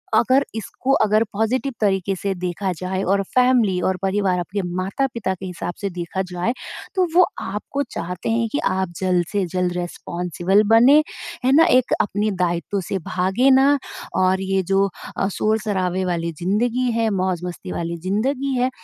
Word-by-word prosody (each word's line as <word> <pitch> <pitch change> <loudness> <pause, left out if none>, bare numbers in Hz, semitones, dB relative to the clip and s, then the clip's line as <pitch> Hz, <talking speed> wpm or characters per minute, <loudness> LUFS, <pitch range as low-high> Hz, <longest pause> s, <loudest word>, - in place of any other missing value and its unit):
अगर 255 +5 +4
इसको 225 +4 -3
अगर 215 +1 +3
पॉजिटिव 245 +6 0
तरीके 195 -2 +1
से 195 +1 -2
देखा 180 +2 -2
जाए 185 +2 -3
और 200 - +2
फैमिली 245 -7 +4
और 190 - 0
परिवार 195 -2 +1
आपके 195 +3 -3
माता-पिता 200 +2 -1
के 190 +1 -8
हिसाब 175 -1 -5
से 200 - -1
देखा 180 +1 -4
जाए, 180 +7 -1 0.4
तो 370 -1 +3
वो 365 0 +7 0.2
आपको 210 +8 -4
चाहते 180 +3 -4
हैं 230 0 +1
कि 290 - 0
आप 190 -1 0
जल्द 180 -2 +1
से 200 -2 0
जल्द 180 -1 0
रिस्पॉन्सिबल 175 +2 0
बने 230 +6 +7 0.5
है 260 - +4
ना, 325 +2 +7
एक 255 -7 +3
अपने 210 +1 -1
दायित्व 180 +1 -1
से 190 - -3
भागे 190 +9 +2
ना 270 +2 +5 0.4
और 185 0 +2
ये 195 0 0
जो 195 0 +3 0.3
अ, 195 - +1
शोर-शराबे 195 -4 0
वाली 170 -2 -1
ज़िन्दगी 240 +7 +1
है, 225 -1 +1
मौज़-मस्ती 185 -3 -3
वाली 170 0 -3
ज़िन्दगी 265 +7 0
है 250 +1 +2
195 Hz, 160 wpm, -21 LUFS, 180-230 Hz, 0.5 s, वो